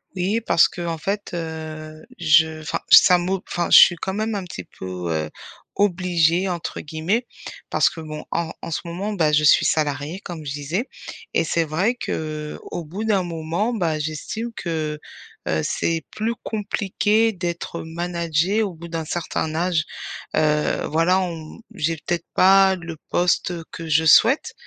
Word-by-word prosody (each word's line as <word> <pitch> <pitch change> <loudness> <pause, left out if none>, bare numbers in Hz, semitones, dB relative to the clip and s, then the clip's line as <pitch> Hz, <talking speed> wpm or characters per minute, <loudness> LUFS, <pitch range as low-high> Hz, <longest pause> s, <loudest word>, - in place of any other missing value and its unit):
Oui, 195 +5 0
parce 165 - +5
qu'en 170 -2 -4
fait, 200 +5 -3
heu, 155 -2 -6 0.2
je 160 -1 +4
enfin 155 - -3
ça 180 - +9
mo 185 +2 -1
enfin 175 -1 -2
je - - +11
suis 175 - +7
quand 190 +3 -4
même 215 +2 -1
un 200 - -3
petit 170 - -7
peu, 90 -2 -4
heu, 80 -1 -1 0.5
«obligée» 180 -2 +2
entre 175 -2 -4
guillemets. 165 +10 -1 0.5
Parce - - +4
que - - -10
bon, 155 -1 -7
en 165 -1 -2
en - - -6
ce 160 - -2
moment, 185 +5 -4
bah 160 -6 +2
je 150 0 +3
suis 150 - +6
salariée, 150 +3 0
comme 170 -5 -8
je 140 - -4
disais, 150 - -2 0.5
et - - +3
c'est 165 +1 +1
vrai 180 +10 0
qu'au 155 -3 -5
bout 185 +8 -5
d'un 200 -4 +2
moment, 170 +6 -2
bah, 170 -8 0
j'estime 155 +10 -4
que, 155 -3 -3 0.5
heu, 80 - +1
c'est 165 - -1
plus 225 +2 -2
compliqué 215 +1 +1
d'être 170 -1 -4
managée 170 +3 -1
au 200 -4 -1
bout 170 +1 -9
d'un 165 -1 -3
certain 160 -1 -3
âge. 170 -2 +1 0.5
Heu, 150 -1 +1
voilà 165 +4 +3
on 165 0 -6
j'ai 165 -4 -1
peut-être 170 +2 -3
pas 195 0 +6
le 165 -3 -8
poste 180 0 +1 0.2
que 165 -1 -7
je 160 +1 +3
souhaite, 235 - +5
170 Hz, 165 wpm, -22 LUFS, 155-190 Hz, 0.5 s, je